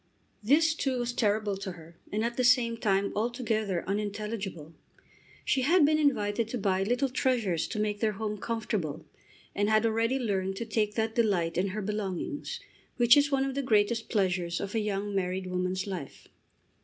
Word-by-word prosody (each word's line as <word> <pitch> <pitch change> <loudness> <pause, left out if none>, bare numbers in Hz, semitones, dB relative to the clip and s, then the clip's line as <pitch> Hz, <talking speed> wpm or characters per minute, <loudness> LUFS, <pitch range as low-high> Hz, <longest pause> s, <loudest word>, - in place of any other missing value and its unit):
This, 305 +9 +4
too, 270 -5 -1
was 240 0 -2
terrible 210 -3 +1
to 190 -1 -5
her, 165 0 -14 0.2
and 215 +2 0
at 235 0 -2
the 255 - 0
same 245 -2 +4
time 200 -3 +1
altogether 220 -5 -1
unintelligible. 205 -5 -4 0.7
She 265 - +2
had 315 +4 +5
been 310 +1 +3
invited 230 -6 +1
to 245 - -3
buy 190 -3 +1
little 245 +7 +1
treasures 235 -10 0
to 215 - -4
make 210 -1 -1
their 215 -1 +1
home 210 0 -4
comfortable, 195 -9 -3 0.5
and 205 +1 +1
had 215 +1 +3
already 230 +3 +1
learned 195 -6 -1
to 230 - -4
take 215 -1 -1
that 220 0 0
delight 190 -8 +1
in 180 +3 +1
her 205 +2 -4
belongings 210 - -3 0.4
which 240 -1 +7
is 285 0 +4
one 270 -1 +2
of 270 - -2
the 280 - -1
greatest 225 -2 +1
pleasures 180 -5 0
of 200 0 -5
a 225 - +1
young 205 -1 -2
married 185 -1 -1
woman's 185 +1 -2
life. 185 -8 -7
210 Hz, 180 wpm, -29 LUFS, 195-240 Hz, 0.7 s, which